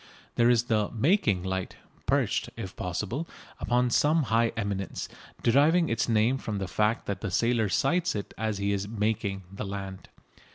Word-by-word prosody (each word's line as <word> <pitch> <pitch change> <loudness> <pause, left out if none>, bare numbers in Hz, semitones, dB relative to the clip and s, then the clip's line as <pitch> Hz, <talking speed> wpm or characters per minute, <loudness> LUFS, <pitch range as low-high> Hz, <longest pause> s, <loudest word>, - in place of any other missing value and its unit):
There 120 0 +4
is 120 -1 +4
the 110 -4 +1
"making" 115 - +2
light, 95 0 -3 0.3
perched, - - +1
if - - -6
possible, 105 - -3 0.3
upon 125 0 +1
some 155 +5 +3
high 115 -1 +2
eminence, 100 -3 -3 0.4
deriving 150 +7 +4
its 115 +1 0
name 115 +4 +3
from 110 -5 -4
the 95 -1 -3
fact 105 +5 0
that 100 - -3
the 105 - -2
sailor 115 +3 +1
sights 175 - +1
it 100 - -5
as 110 -1 -2
he 100 0 0
is 100 0 -2
"making" 105 -2 -1
the 100 - -5
land. 95 -1 -6
110 Hz, 165 wpm, -28 LUFS, 100-120 Hz, 0.4 s, There